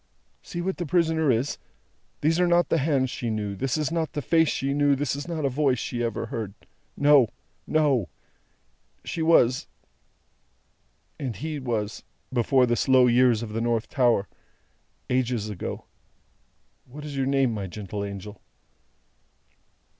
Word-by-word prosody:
See 175 - -6
what 190 +1 -2
the 175 - -3
prisoner 160 -1 +2
is. 125 +3 0 0.6
These 160 +3 +2
are 180 - +4
not 175 -2 +3
the 165 - +2
hands 135 -3 +1
she 120 - -3
knew, 105 -2 -2
this 130 +8 -1
is 155 -1 -1
not 165 -2 -1
the 145 - -2
face 165 -1 +3
she 135 +1 -1
knew, 145 0 +3
this 140 0 -1
is 145 +3 -6
not 160 -4 -2
a - - +4
voice 135 -1 +1
she 120 +1 -3
ever 115 -1 -2
heard. 110 -3 -5 0.4
No, 145 -5 +5 0.4
no. 140 - +2 1.0
She 165 - -3
was 130 -6 +4 1.5
and 130 -6 -3
He 150 +6 -4
was 110 -5 -3 0.3
before 125 +1 +3
the 120 -1 +1
slow 130 +1 +4
years 120 -2 +4
of 105 -2 -7
the 115 - -1
North 115 0 0
Tower 120 -7 +2 0.8
ages 125 -4 0
ago. 95 - -6 1.0
What 145 +4 -10
is 145 -2 -6
your 135 -1 0
name, 135 -3 +2
my 100 -3 -4
gentle 100 +1 -6
angel?" 100 +1 -7
130 Hz, 155 wpm, -25 LUFS, 115-150 Hz, 1.5 s, No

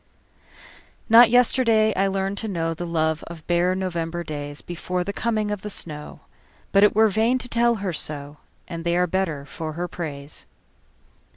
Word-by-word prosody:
Not 230 +1 +8
yesterday 230 -3 +4
I 195 +1 +1
learned 195 +1 -2
to 220 - -3
knowThe 170 -1 -3
love 160 -1 0
of 165 -2 -10
bare 175 +1 +2
November 175 -2 -3
daysBefore 160 +4 -4
the 200 - -3
coming 215 -1 -1
of 205 -2 -3
the 210 - -6
snow, 150 -6 -5 0.5
But 195 - +5
it 210 - +4
were 220 +1 +6
vain 220 +5 +2
to 250 - -4
tell 235 0 +2
her 195 -4 -3
so, 145 -1 -2 0.3
And 170 -2 -6
they 170 0 +1
are 180 - +3
better 165 -6 -2
for 155 +2 -6
her 175 +3 -3
praise. 145 - -7
180 Hz, 165 wpm, -23 LUFS, 165-210 Hz, 0.5 s, Not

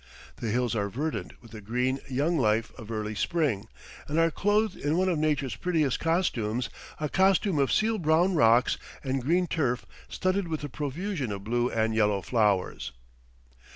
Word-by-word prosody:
The 115 - -3
hills 120 0 0
are 100 -2 0
verdant 120 - -4
with 115 - -15
the 110 -1 -9
green 125 +5 -1
young 145 +6 +1
life 110 -1 +1
of 115 -4 -11
early 110 -1 -3
spring, 115 - 0 0.4
and 150 - -2
are 165 0 +4
clothed 210 +5 +1
in 150 +3 -1
one 185 +1 +2
of 175 -4 +1
nature's 145 -6 0
prettiest 155 -2 0
costumes 125 - 0 0.3
a 150 - -1
costume 190 0 +3
of 140 - +2
seal 220 0 +2
brown 170 +3 +3
rocks 120 -4 +4 0.2
and 135 -1 -1
green 175 +8 +2
turf 130 -7 -1 0.2
studded 185 0 0
with 160 -2 -3
a 145 - -4
profusion 150 - -3
of 100 -1 -5
blue 120 +3 0
and 110 0 0
yellow 105 -3 +2
flowers. 100 - 0
135 Hz, 170 wpm, -28 LUFS, 115-165 Hz, 0.4 s, are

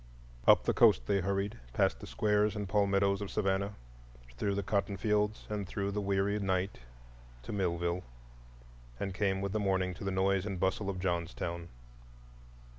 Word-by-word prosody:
Up - - +7
the - - +1
coast - - +5
they 100 +7 +1
hurried, 100 +2 -1
past - - +2
the - - -9
squares 105 0 +2
and 105 -1 -3
palmettos 100 0 +2
of 100 - -4
Savannah, 100 0 0 0.6
through 100 +10 -1
the 100 - -1
cotton 100 0 0
fields 105 +1 0
and 105 -2 -3
through 100 +1 -2
the 105 +1 -1
weary 100 +1 +1
night, 95 -1 -1 0.6
to - - -6
Millville, 85 -2 0 1.0
and 100 -1 -2
came 95 0 0
with 100 0 -2
the 110 - 0
morning 95 -2 +1
to 95 - -9
the 100 - -1
noise 95 0 +2
and 100 -3 -4
bustle 95 +2 0
of 95 -2 -3
Johnstown. 85 -1 -2
100 Hz, 165 wpm, -32 LUFS, 95-100 Hz, 1.0 s, Up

